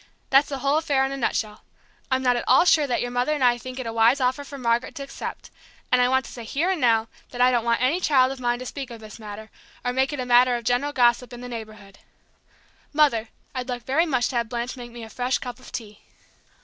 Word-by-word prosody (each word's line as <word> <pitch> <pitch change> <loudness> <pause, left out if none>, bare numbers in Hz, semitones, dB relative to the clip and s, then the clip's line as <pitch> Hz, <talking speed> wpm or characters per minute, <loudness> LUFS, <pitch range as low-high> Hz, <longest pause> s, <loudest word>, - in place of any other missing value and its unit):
That's 275 +2 +5
the 275 - -3
whole 280 +3 +2
affair 280 -4 +1
in 270 - -3
a 275 - -4
nutshell. 215 -4 -2 0.5
I'm 260 0 +1
not 250 -1 +3
at 240 - -2
all 265 +7 +6
sure 305 -4 +4
that 245 - 0
your 245 - -4
mother 245 +5 +1
and 290 -3 -1
I 240 -1 +4
think 255 +1 -8
it 255 - -4
a 225 - -4
wise 230 +4 +4
offer 260 +2 0
for 280 0 -9
Margaret 235 -1 0
to 280 - -5
accept, 275 - -7 0.4
and 250 0 +5
I 245 - +3
want 260 0 +2
to - - -10
say 240 - -8
here 305 +11 0
and 360 -5 -2
now 225 -2 +3 0.2
that 245 - -9
I 250 +1 +5
don't 240 -2 +1
want 235 0 +1
any 290 +8 +2
child 265 -6 +3
of 270 - -7
mine 240 -1 0
to 255 - -8
speak 270 0 -6
of 235 -1 -9
this 215 +1 -11
matter, 215 0 -9 0.3
or 245 - 0
make 265 +2 +1
it 290 - -4
a 255 - -2
matter 245 0 +5
of 240 - -4
general 250 +5 +1
gossip 245 -1 +2
in 240 - -9
the 250 - -7
neighborhood. 215 -4 -9 0.9
Mother, 275 -7 +2 0.2
I'd 255 0 -4
like 245 -2 -4
very 315 +6 +2
much 255 -5 +1
to 250 - -2
have 235 -1 -1
Blanche 240 +2 -3
make 245 -2 -9
me 235 -1 -10
a - - -8
fresh 250 +2 0
cup 245 -1 -7
of 255 - -14
tea." 210 -3 -7
250 Hz, 265 wpm, -24 LUFS, 235-270 Hz, 0.9 s, all